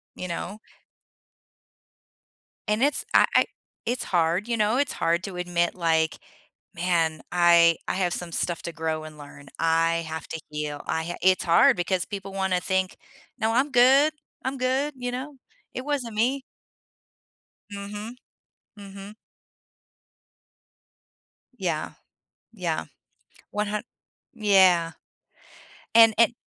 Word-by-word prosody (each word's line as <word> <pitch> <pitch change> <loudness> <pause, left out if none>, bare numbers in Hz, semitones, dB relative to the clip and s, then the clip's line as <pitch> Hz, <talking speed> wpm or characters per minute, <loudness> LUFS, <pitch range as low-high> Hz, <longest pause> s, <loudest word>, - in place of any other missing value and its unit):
You 180 - -6
know? 185 +4 -5 2.1
And 210 +2 +1
it's 285 0 +1
I - - +7
I - - +6 0.4
it's 245 +2 -2
hard, 175 +4 +1
you 235 - 0
know? 215 +3 +2
It's 280 -1 0
hard 170 +2 0
to 195 -3 -7
admit 175 -1 0
like, 160 -2 +1 0.6
"Man, 170 -2 0
I 170 -1 +5
I - - -1
have 180 -2 0
some 175 -1 -5
stuff 170 0 -2
to 170 - -5
grow 160 -1 -2
and 155 -1 -10
learn, 145 -1 -12
I 165 0 +2
have 160 -1 -6
to 160 - -5
heal, 150 -1 -4
I 160 - -1
ha" 175 +1 -4
It's 185 0 +3
hard 170 +1 +5
because 180 0 0
people 195 -1 -7
wanna 190 -2 0
think, 190 0 -1 0.4
"No, 220 +1 0
I'm 260 +5 +2
good, 270 +5 +5 0.3
I'm 265 +1 -2
good, 265 +3 0
you 245 -1 -3
know? 270 +4 -6 0.4
It 255 - -5
wasn't 260 -7 -2
me." 255 +5 +1 1.3
Mhm. 205 +3 -7 0.6
Mhm. 200 +1 -10 2.4
Yeah. - - -2 0.6
Yeah. - - -3 0.7
One 210 0 -1
hun 210 0 -3 0.5
yeah. 190 -7 +4 1.0
And 225 -1 +8
and 230 +1 +5
190 Hz, 125 wpm, -25 LUFS, 170-230 Hz, 2.4 s, And